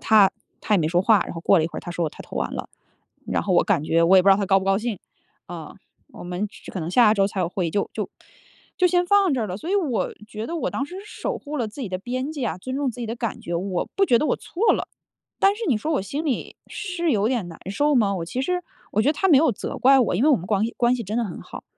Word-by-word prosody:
他 210 -3 +5 0.3
他 210 - +2
也 - - +4
没 155 -2 +1
说 175 +2 +2
话。 215 0 +5
然 - - -7
后 165 - -6
过 195 - +5
了 155 - +2
一 - - 0
会 - - -10
儿， - - -3
他 175 - -7
说 170 -2 -1
他 - - -11
投 - - -9
完 - - -2
了， - - -5 0.6
然 - - 0
后 - - -1
我 - - +4
感 145 - +1
觉 165 +1 +2
我 190 +3 +6
也 185 - +7
不 200 - +3
知 - - +9
道 - - +4
他 200 -1 -1
高 195 0 +4
不 190 - -5
高 195 - +3
兴。 220 -4 -3 0.5
啊， 165 -3 -8 0.4
我 - - -10
们 180 +4 -3 0.2
可 - - -4
能 160 - -4
下 220 +1 +6
周 195 -2 +3
才 200 -1 -3
有 170 - 0
会 180 -1 -2
议 - - -2
就 200 - -1
就 - - -3 0.7
就 365 - +5
先 355 0 +2
放 390 -5 +3
这 235 -4 0
了。 185 -2 -4
所 320 - -8
以 400 - +1
我 295 - 0
觉 215 0 -5
得 335 - -5
我 - - -2
当 275 - -2
时 365 +4 -8
是 425 +1 -12
守 - - -1
护 300 +1 -6
了 235 -4 -1
自 245 +7 -10
己 235 - -3
的 185 0 -3
边 255 +7 -3
界 280 -5 -3
啊， 175 - -2
尊 260 +7 -5
重 280 -2 0
自 245 - -10
己 235 - -3
的 230 +2 -4
感 230 -3 -3
觉。 170 - -5
我 185 0 -2
不 390 0 +4
觉 235 - +4
得 - - +1
我 - - +1
错 420 +7 +1
了， - - -2 0.5
但 395 +1 +4
是 460 - -8
你 250 - +3
说 310 +9 -2
我 285 - +1
心 285 +11 -4
里 270 -6 -2
是 345 -6 -2
有 210 0 +2
点 235 -8 -1
难 165 - -10
受 290 +8 +2
吗？ 205 -5 +3
我 165 - -3
其 255 +10 -3
实 360 +3 -1 0.3
我 210 - +2
觉 245 - +2
得 - - +4
他 385 +5 0
没 295 -6 +7
有 305 -3 +3
责 - - -6
怪 270 +1 +6
我， 220 -7 +1
因 245 - +2
为 - - +5
我 290 - +6
们 175 - -7
光 205 -1 +1
关 240 +1 +3
系 235 - -4
真 215 +4 -3
的 240 - +1
很 180 - -7
好， - - -10
225 Hz, 330 characters per minute, -23 LUFS, 190-290 Hz, 0.7 s, 知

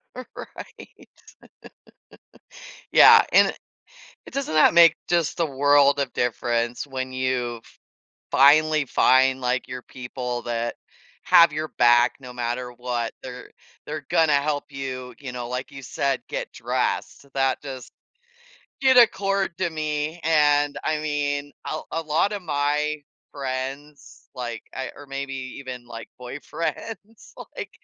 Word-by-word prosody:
Right. 255 - -11 1.8
Yeah, - - +8
and - - +6
it - - -6 0.7
eh, - - -10
doesn't 275 - -3
that 155 - +5
make 170 -1 +7
just 170 -3 0
the 170 - +2
world 140 0 +4
of 140 -2 -2
difference 120 +1 -1
when 130 -1 -4
you 130 -2 -1
f - - -22 0.5
finally 155 +1 +5
find, 130 +1 +3
like, 125 +1 -1
your 125 -1 -6
people 125 -1 -6
that 120 0 -3 0.5
have 170 -2 +6
your 155 +1 -3
back 120 +1 +5
no 125 -2 -10
matter 125 0 -3
what, 120 -1 -3
they're 125 -1 -9 0.4
they're - - -6
gonna 160 -2 +3
help 145 0 0
you, 130 -2 -6
you 135 -3 -7
know, 120 -1 -5
like 125 +1 -4
you 135 -1 -10
said, 135 +1 -1
get - - -4
dressed, - - -2
that 135 -1 0
just 130 -3 -8 0.9
did 265 -1 +4
accord 195 -6 +3
to 185 - 0
me, 155 +1 -3
and, 145 -2 +3
I 155 -1 0
mean, 145 -1 -2 0.2
a 155 - -3
a 165 - -1
lot 160 +6 +1
of 205 -2 -4
my 150 -1 0 0.4
friends, 135 +2 -6
like, 120 -2 -5
I 130 -2 -4
or 145 - -12
maybe 135 0 -5 0.3
even, 125 -3 -8
like, 115 -1 -9
boyfriends, 170 - -6 0.2
like, - - -6
140 Hz, 135 wpm, -24 LUFS, 125-155 Hz, 1.8 s, Yeah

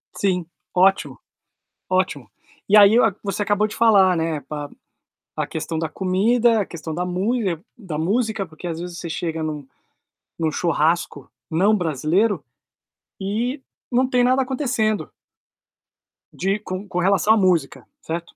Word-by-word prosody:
Sim. 180 -3 0 0.3
Ótimo. 190 +2 +2 0.7
Ótimo. 180 -10 0 0.4
E 210 - +7
aí, 205 +1 +8
é 240 - +6
o 200 - -4
você 200 +1 -2
acabou 205 +1 +1
de 215 - -9
falar, 195 -5 +5
né, 160 -2 -1
pa 145 +1 -6 0.7
a - - -1
questão 160 0 -4
da 160 - -1
comida, 215 +7 +2
a - - -2
questão 160 -2 -7
da 180 - -2
mule 190 0 -1 0.2
da 185 -9 -6
música. 215 +4 0
Porque, 160 +1 -13
às 165 -1 -4
vezes, 175 0 -6
você 170 - -6
chega 165 0 -3
num 150 -3 -5 0.7
num 160 -1 0
churrasco 165 +1 0 0.2
não 195 +7 +3
brasileiro, 170 - +1 0.8
e 230 +8 -2 0.3
não 255 +2 +3
tem 250 -1 +2
nada 255 +2 +3
acontecendo. 250 -5 -1 1.2
De 195 +2 -1
com 195 -1 -6
com 180 - -2
relação 195 +3 +3
à - - +3
música, 170 - +1
certo? 170 +1 -6
185 Hz, 145 wpm, -22 LUFS, 165-215 Hz, 1.2 s, aí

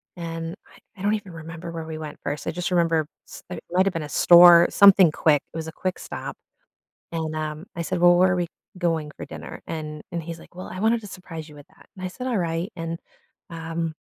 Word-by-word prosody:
and 165 -1 -5
I - - -20 0.2
I - - -8
don't 205 +1 +2
even 205 -3 -7
remember 165 +1 -8
where 165 -1 -5
we 160 -1 -6
went 155 -1 -7
first, 145 +1 -4
I - - +1
just 180 +2 -3
remember 165 -3 +2 0.2
s - - -11
it 180 - -7
might 185 +2 +3
have 195 - +1
been 165 - -3
a 150 - -7
store, 175 +1 +8
something 195 -4 +7
quick, 150 -2 +3
it - - -6
was 160 0 -4
a - - -5
quick 185 +3 -3
stop, - - -6 0.8
and, 160 -2 -3
um, 155 +1 -4
I 170 - -3
said, 180 +2 -2
"Well, 175 0 +6
where 185 +1 +5
are - - +1
we 175 -1 -1 0.3
going 165 -4 -1
for - - -6
dinner?" - - -9
And 150 -1 -5
and 170 -2 -3
he's 165 0 -7
like, - - -17
"Well, 185 - -7
I 185 - -7
wanted 225 +3 +2
to 205 - -9
surprise 165 -5 -8
you 150 - -14
with 145 -1 -14
that," - - -22
and 185 - -9
I - - -2
said, 250 +7 -6
"All 245 -4 0
right," 170 +2 -2
and, 165 -1 -4 0.5
um 165 -1 -4
165 Hz, 245 wpm, -24 LUFS, 160-180 Hz, 0.8 s, store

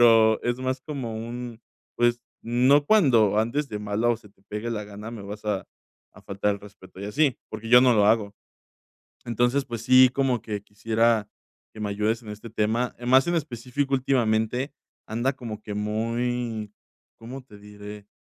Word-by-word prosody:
pero 115 -2 +6
es 120 +1 -1
más 130 0 -2
como 130 -6 -5
un, 120 0 -6 0.4
pues, 120 0 +2 0.2
no 130 +5 +4
cuando 120 - +4
andes 140 +6 0
de 105 - -4
malas 105 +3 0
o 115 - -2
se 105 -2 -18
te 95 - -30
pegue 105 +3 -4
la 105 -2 -3
gana, 105 +2 -9
me 110 -4 -8
vas 105 +2 -8
a 105 -2 -2 0.5
a - - -16
faltar 100 +1 -1
el 100 - -10
respeto 100 -2 -15
y - - -5
así, 135 +5 +1
porque 115 - -7
yo 125 +1 +8
no 130 -1 +5
lo 105 -1 +4
hago. 105 -2 +2 0.9
Entonces, 120 +4 +1
pues 115 -3 -6
sí, 130 +1 +7
como 135 -3 0
que 105 -3 -4
quisiera 110 +1 +1 0.4
que - - -13
me 105 - -2
ayudes 110 +3 0
en 110 - -12
este 105 +2 -9
tema. 115 +3 0
Más 130 +2 +5
en 175 - +1
específico, 135 -1 -2
últimamente 125 0 +1 0.3
anda 120 +5 0
como 115 -5 -7
que 105 -1 -6
muy, 115 +1 -2 0.5
¿cómo 130 +3 -9
te 105 - -15
diré? 105 0 -11
115 Hz, 180 wpm, -25 LUFS, 105-125 Hz, 0.9 s, yo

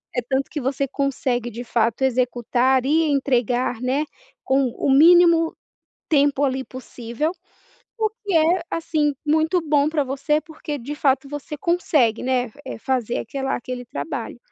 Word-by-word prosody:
é 245 - +1
tanto 270 0 0
que 300 - -4
você 270 +1 -1
consegue 255 -3 -1
de 235 +2 -6
fato 230 0 0
executar 255 0 +1
e 315 +4 +3
entregar, 250 -3 0
né, 270 +4 0 0.4
com 270 +1 +2
o - - -1
mínimo 330 +2 +6 0.5
tempo 285 -2 +3
ali, 265 -1 0
possível. 255 +3 -4 0.7
O 435 - +4 0.2
que 400 - -2
é, 330 +2 +3
assim, 315 -3 0
muito 315 +4 +2
bom 295 -3 +2
pra 310 -2 +1
você 280 +3 0
porque 310 -3 -7
de 275 +4 -6
fato 275 -1 +1
você 290 +2 -6
consegue, 295 -9 +1
né, 250 -2 0
eh, 265 - -6
fazer 240 -1 -1
aquela 270 +3 -3
aquele 250 0 -5
trabalho. 225 +6 -5
275 Hz, 150 wpm, -22 LUFS, 250-305 Hz, 0.7 s, mínimo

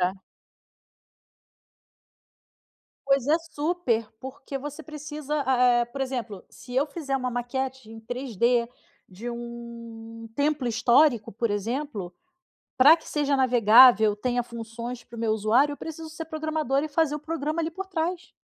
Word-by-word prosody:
Aham. 180 +1 +2 2.9
Pois 275 -2 +2
é 310 +3 +4
super, 310 -7 -1
porque 265 +1 -7
você 295 +3 -7
precisa 300 -1 -4
a 255 -1 +3 0.2
é - - +2
por 240 +3 -9
exemplo, 245 -7 -4
se 245 - -11
eu 270 +3 +2
fizer 285 -2 -3
uma 255 -1 -2
maquete 255 0 -4
em 225 0 -10
3D 240 0 0 0.4
de 210 +6 -7
um 235 -1 -9
templo 285 -2 0
histórico, 235 +1 +3
por 230 +2 -1
exemplo, 205 -2 -3 0.6
pra 285 +5 +8
que 325 - -16
seja 290 -2 +1
navegável, 235 -3 +6
tenha 245 +3 -1
funções 235 +1 -7
para 235 - -13
o - - -6
meu 225 -1 +1
usuário, 225 +7 +3
eu - - -10
preciso 320 0 -7
ser 320 +1 -7
programadora 310 -3 -1
e - - -7
fazer 300 0 +1
o - - -5
programa, 310 +1 -3
ali, 325 0 -2
por 380 +3 -6
trás. 350 0 -3
260 Hz, 145 wpm, -26 LUFS, 235-300 Hz, 2.9 s, pra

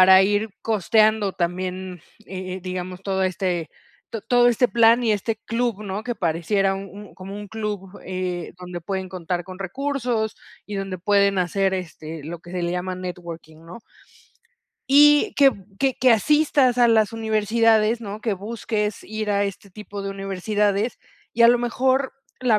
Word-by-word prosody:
Para 190 +1 +8
ir 205 +2 +1
costeando 215 -1 +2
también, 185 0 -3 0.3
eh 185 -1 -6
eh, 190 - -6
digamos, 185 0 -5
todo 190 -1 -1
este 180 -3 -1 0.4
to 225 - -4
todo 245 -1 +4
este 240 +1 +3
plan, 230 +3 +5
y 225 -2 +2
este 220 +2 -1
club, 230 -3 -1
¿no? 200 0 -4
Que 245 - -2
pareciera 195 +2 0
un 195 +1 -6
un 205 0 -12
como 190 +1 -9
un 205 0 -7
club, 205 -3 -5
eh, 180 -2 -4
donde 180 -1 -7
pueden 190 +2 -4
contar 175 -1 -3
con 185 0 -10
recursos, 240 +1 -2 0.3
y 205 - -6
donde 195 -1 -3
pueden 200 +1 +3
hacer, 190 +2 +1
este, 160 -3 -6
lo 170 +2 -6
que 170 +1 -14
se 180 -1 -2
le 170 - -1
llama, 180 +1 -2
networking, 170 -3 -8
¿no? 180 +7 -10 1.1
Y 295 +2 +6
que 275 -1 +6
b 200 -6 -13
que 270 -2 +2
que 255 -1 +4
asistas 280 0 +3
a 240 - +6
las 220 -1 +3
universidades, 220 0 +2
¿no? 210 -1 -6
Que 215 -1 -1
busques 210 +1 -3
ir, 215 0 -4
a 200 0 +2
este 200 0 -5
tipo 205 +1 -8
de 195 - -3
universidades, 200 +3 -1 0.3
y 235 - +2
a 235 - +9
lo 245 - +5
mejor 260 +3 +1 0.3
La 235 -4 +3
200 Hz, 175 wpm, -23 LUFS, 185-225 Hz, 1.1 s, a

